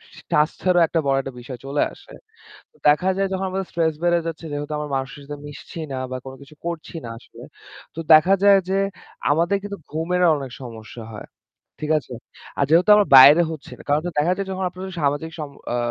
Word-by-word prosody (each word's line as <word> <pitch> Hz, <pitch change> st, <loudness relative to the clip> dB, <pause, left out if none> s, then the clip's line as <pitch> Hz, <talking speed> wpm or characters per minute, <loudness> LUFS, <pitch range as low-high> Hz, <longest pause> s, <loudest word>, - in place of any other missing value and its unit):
স -, -, -13 dB
স্বাস্থ্যেরও 170 Hz, +3 st, +2 dB
একটা 165 Hz, -, 0 dB
বড় 135 Hz, 0 st, +2 dB
একটা 135 Hz, -1 st, -8 dB
বিষয় 120 Hz, 0 st, -9 dB
চলে 140 Hz, +2 st, -1 dB
আসে। -, -, -16 dB, 0.6 s
তো -, -, -28 dB
দেখা 165 Hz, +6 st, +4 dB
যায় 195 Hz, 0 st, +1 dB
যখন 190 Hz, 0 st, -2 dB
আমাদের 190 Hz, 0 st, -3 dB
স্ট্রেস 160 Hz, -2 st, +1 dB
বেড়ে 175 Hz, 0 st, +3 dB
যাচ্ছে, 165 Hz, 0 st, -5 dB
যেহেতু 145 Hz, +1 st, -4 dB
আমরা 150 Hz, -1 st, -4 dB
মানুষের 135 Hz, +2 st, -4 dB
সাথে 145 Hz, 0 st, -7 dB
মিশছি 145 Hz, +3 st, -10 dB
না 130 Hz, -, -3 dB
বা 130 Hz, -, -3 dB
কোনকিছু 140 Hz, +3 st, -12 dB
করছি 170 Hz, -1 st, -5 dB
না -, -, -6 dB
আসলে। -, -, -14 dB, 0.5 s
তো -, -, -6 dB
দেখা 175 Hz, +5 st, +6 dB
যায় 200 Hz, -1 st, +7 dB
যে 195 Hz, -, +1 dB, 0.5 s
আমাদের 170 Hz, +6 st, +2 dB
কিন্তু 200 Hz, -1 st, -6 dB
ঘুমেরও 175 Hz, +3 st, +1 dB
অনেক 135 Hz, -3 st, -7 dB
সমস্যা 115 Hz, -1 st, -9 dB
হয়। 105 Hz, -, -9 dB, 0.5 s
ঠিক 155 Hz, +1 st, -2 dB
আছে? 130 Hz, -, -12 dB, 0.5 s
আর 140 Hz, -, +3 dB
যেহেতু 175 Hz, +6 st, +4 dB
আমরা 205 Hz, -1 st, +3 dB
বাইরে 145 Hz, +6 st, +9 dB
হচ্ছি 155 Hz, -3 st, -9 dB
না। -, -, -13 dB
কারণ 150 Hz, +2 st, +3 dB, 0.2 s
দেখা 165 Hz, +4 st, +2 dB
যায় 195 Hz, -, -2 dB, 0.3 s
আপনাদের 185 Hz, +1 st, -8 dB
সামাজিক 145 Hz, +3 st, -1 dB
সম্প 140 Hz, -2 st, -7 dB, 0.2 s
আ -, -, 0 dB
155 Hz, 195 wpm, -22 LUFS, 140-180 Hz, 0.6 s, বাইরে